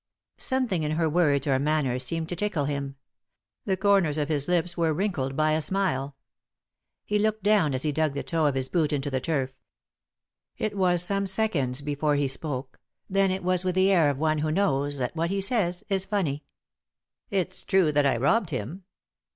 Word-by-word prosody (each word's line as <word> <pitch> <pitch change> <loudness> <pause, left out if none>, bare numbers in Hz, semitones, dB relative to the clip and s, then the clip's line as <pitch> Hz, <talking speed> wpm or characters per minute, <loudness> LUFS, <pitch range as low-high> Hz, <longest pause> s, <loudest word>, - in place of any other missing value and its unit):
Something 250 -10 0
in 150 0 -1
her 165 +1 +1
words 150 -4 +2
or 135 -2 +2
manner 140 -3 0
seemed 160 +6 0
to 175 - +1
tickle 175 -6 -1
him. 140 -1 -3 0.7
The 190 -2 0
corners 190 -6 +2
of 150 0 -1
his 145 -2 0
lips 175 -1 +1
were 165 -3 +1
wrinkled 155 -8 -2
by 155 0 +2
a 155 +1 +1
smile. 145 -7 -1 0.9
He 210 0 0
looked 215 -1 0
down 200 -9 +3
as 130 - -2
he 155 - 0
dug 155 -1 0
the 140 - -3
toe 160 -3 0
of 140 - 0
his 130 -1 0
boot 160 -2 0
into 145 -1 -2
the 130 - 0
turf. 135 -4 -1 1.1
It 215 -1 -2
was 180 -3 +3
some 200 +2 -1
seconds 165 - +1
before 145 +1 0
he 145 -1 +1
spoke, 135 -1 -4 0.3
then 195 0 +3
it 185 0 -2
was 180 0 +1
with 185 -1 -1
the 190 +1 +4
air 165 -6 +4
of 140 - -2
one 155 +1 +1
who 155 +1 -1
knows 145 -6 0
that 125 +3 -3
what 165 +1 -1
he 195 +1 -1
says 195 -4 +1
is 190 -1 0
funny. 165 -8 -2 0.4
" - - -66
It's 185 -1 -2
true 185 -5 +2
that 145 -1 +3
I 135 - +1
robbed 180 - +2
him." 150 - -5
160 Hz, 200 wpm, -26 LUFS, 140-190 Hz, 1.1 s, the